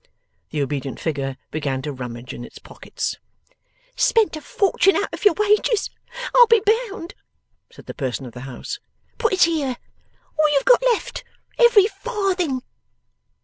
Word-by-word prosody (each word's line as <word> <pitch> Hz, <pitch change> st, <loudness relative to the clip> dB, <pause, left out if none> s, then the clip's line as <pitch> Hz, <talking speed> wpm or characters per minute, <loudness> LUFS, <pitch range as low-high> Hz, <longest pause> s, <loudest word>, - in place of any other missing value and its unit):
The 150 Hz, -2 st, -1 dB
obedient 135 Hz, -1 st, -4 dB
figure 135 Hz, -4 st, -3 dB
began 140 Hz, -4 st, -2 dB
to 150 Hz, -, -3 dB
rummage 125 Hz, -2 st, -7 dB
in 120 Hz, -, -8 dB
its -, -, -11 dB
pockets. -, -, -5 dB, 0.8 s
'Spent 445 Hz, -7 st, +3 dB
a 310 Hz, -, -7 dB
fortune 390 Hz, 0 st, +2 dB
out -, -, -1 dB
of -, -, -6 dB
your 410 Hz, -, +6 dB
wages, 420 Hz, +1 st, +2 dB, 0.4 s
I'll 485 Hz, -1 st, +8 dB
be 460 Hz, -1 st, +5 dB, 0.3 s
bound!' 390 Hz, -4 st, -8 dB, 0.6 s
said -, -, -15 dB
the -, -, -7 dB
person 130 Hz, -2 st, -3 dB
of 120 Hz, -, -10 dB
the 125 Hz, -, -9 dB
house. 270 Hz, -, -6 dB, 0.4 s
'Put 450 Hz, -3 st, +2 dB
it 375 Hz, -, +5 dB
here! 295 Hz, -7 st, +1 dB, 0.6 s
All 305 Hz, 0 st, +5 dB
you've 280 Hz, -, +2 dB
got -, -, +6 dB
left! 460 Hz, -, -3 dB, 0.4 s
Every 475 Hz, -5 st, +7 dB
farthing! 390 Hz, -, -2 dB
315 Hz, 150 wpm, -22 LUFS, -, 0.8 s, I'll